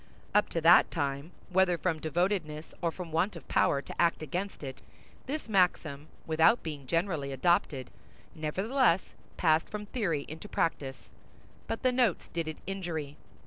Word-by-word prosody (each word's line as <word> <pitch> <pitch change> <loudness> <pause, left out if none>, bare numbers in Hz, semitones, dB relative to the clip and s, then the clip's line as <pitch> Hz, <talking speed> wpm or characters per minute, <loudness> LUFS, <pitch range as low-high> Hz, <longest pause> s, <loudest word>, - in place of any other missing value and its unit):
Up 210 +1 +4
to 165 - -1
that 170 +2 +7
time, 140 -1 -2 0.2
whether 180 -1 +3
from 165 -2 -1
devotedness 160 -1 -1
or 170 - +2
from 170 0 -7
want 180 +5 +1
of 165 - -10
power 140 0 +2
to - - -4
act 170 -2 +2
against 180 +4 -4
it, 135 -1 -7 0.5
this 295 +1 -3
maxim, 170 -7 +1 0.2
without 165 +9 +4
being 145 -5 -6
generally 165 -3 0
adopted, 135 -2 +1 0.4
nevertheless 190 - +1 0.2
passed 160 -2 +3
from 210 0 -5
theory 180 - -1
into 160 +7 -9
practice; 135 -5 -2 0.6
but 225 - -3
the 255 - +4
notes 245 -7 +1
did 165 -2 -3
it 155 - -5
injury. 170 -7 -4
165 Hz, 150 wpm, -30 LUFS, 155-190 Hz, 0.6 s, that